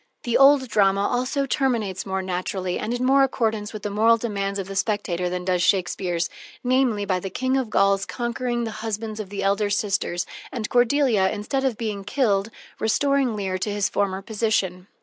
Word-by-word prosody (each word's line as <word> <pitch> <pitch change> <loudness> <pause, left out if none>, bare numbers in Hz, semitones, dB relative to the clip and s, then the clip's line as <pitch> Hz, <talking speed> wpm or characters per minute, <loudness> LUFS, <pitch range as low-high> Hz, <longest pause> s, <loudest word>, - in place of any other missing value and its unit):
The 240 - -1
old 275 -1 +6
drama 200 -3 +3
also 255 +3 0
terminates 230 -9 -1
more 190 0 -2
naturally 185 0 -2
and 235 +3 -2
more 265 +2 +4
in 270 - +6
accordance 220 -5 -1
with 215 -2 -8
the 205 - -3
moral 225 +3 +4
demands 200 -3 -2
of 195 -2 -4
the 195 - -7
spectator 185 -4 -1
than 180 0 -4
does 180 -1 +1
Shakespeare's, 180 -2 +1 0.4
namely, 250 -5 +2
by 185 -2 0
the 195 - -5
King 260 +7 -1
of 265 -3 0
the - - -15
Gauls 195 -1 +2
conquering 240 0 -2
the 225 - -3
husbands 220 0 -4
of 205 -3 -5
the 200 -1 -4
elder 200 +1 +1
sisters, 200 -3 -1 0.3
and 235 -6 -3
Cordelia, 245 -5 +3
instead 265 +8 -2
of 260 -5 0
being 210 -4 -3
killed, 205 -2 +1 0.3
restoring 270 +2 +1
Leir 190 -2 -2
to 210 - -2
his 205 -1 0
former 195 -1 -1
position. 200 -4 -1
210 Hz, 190 wpm, -24 LUFS, 195-240 Hz, 0.4 s, old